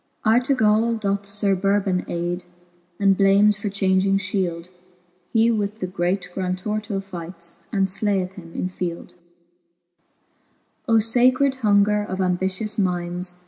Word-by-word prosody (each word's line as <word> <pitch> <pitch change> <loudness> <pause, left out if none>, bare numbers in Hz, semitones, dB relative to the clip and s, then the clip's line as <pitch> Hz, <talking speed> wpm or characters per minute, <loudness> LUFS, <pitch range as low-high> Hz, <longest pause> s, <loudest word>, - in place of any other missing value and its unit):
ArUgall 230 -1 +3
doth 200 -1 -2
Sir 200 -1 +1
Burhon 195 -1 0
aide. 175 +1 -3 0.5
And 195 -1 +4
blames 200 +2 +4
for 210 - -2
changing 195 0 +2
Jhi 190 -1 -1
eld 170 +1 -9
r 180 - -30 0.5
He 230 0 +3
with 210 -1 -2
the 185 - -2
great 180 0 -2
Grantor 185 +3 -2
to 200 -2 -3
fight 180 -2 -8
fj 170 0 -9
And 195 -2 +2
jlaieth 195 -1 0
him 175 -3 -12
infield, 180 -2 -4 1.8
I. 225 - +5
Sacred 255 +5 +3
hunger 210 -1 +3
of 190 -2 -5
ambitious 190 +3 -1
mindes. 180 -1 -1
195 Hz, 135 wpm, -22 LUFS, 180-210 Hz, 1.8 s, I